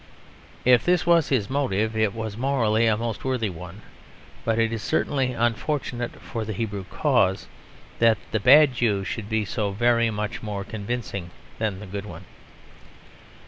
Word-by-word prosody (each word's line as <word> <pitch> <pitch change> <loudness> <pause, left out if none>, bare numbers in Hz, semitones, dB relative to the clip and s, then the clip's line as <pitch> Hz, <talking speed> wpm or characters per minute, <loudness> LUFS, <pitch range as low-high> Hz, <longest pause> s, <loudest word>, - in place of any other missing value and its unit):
If 125 -2 +6
this 180 -1 +2
was 170 -3 +4
his 120 -8 +1
motive, 110 -5 0
it 110 -2 +2
was 110 -2 -4
morally 115 -3 +2
a 110 -1 +3
most 115 -1 -4
worthy 125 -6 -1
one. 90 +4 -10 0.6
But 115 -1 0
it 115 0 +1
is 115 - -3
certainly 130 +1 0
unfortunate 120 +1 -2
for 115 -3 -5
the 110 0 -4
Hebrew 100 -2 -4
cause 95 +1 +1 0.5
that 115 -2 +5
the 110 - +1
bad 140 +5 +7
Jew 110 -5 +1
should 105 +1 -5
be 110 -1 0
so 105 0 -2
very 115 +2 +3
much 105 -1 -4
more 105 -2 -4
convincing 100 -3 -5 0.3
than 105 -4 -1
the 105 - -8
good 100 +1 -6
one. - - -10
110 Hz, 160 wpm, -24 LUFS, 105-120 Hz, 0.6 s, bad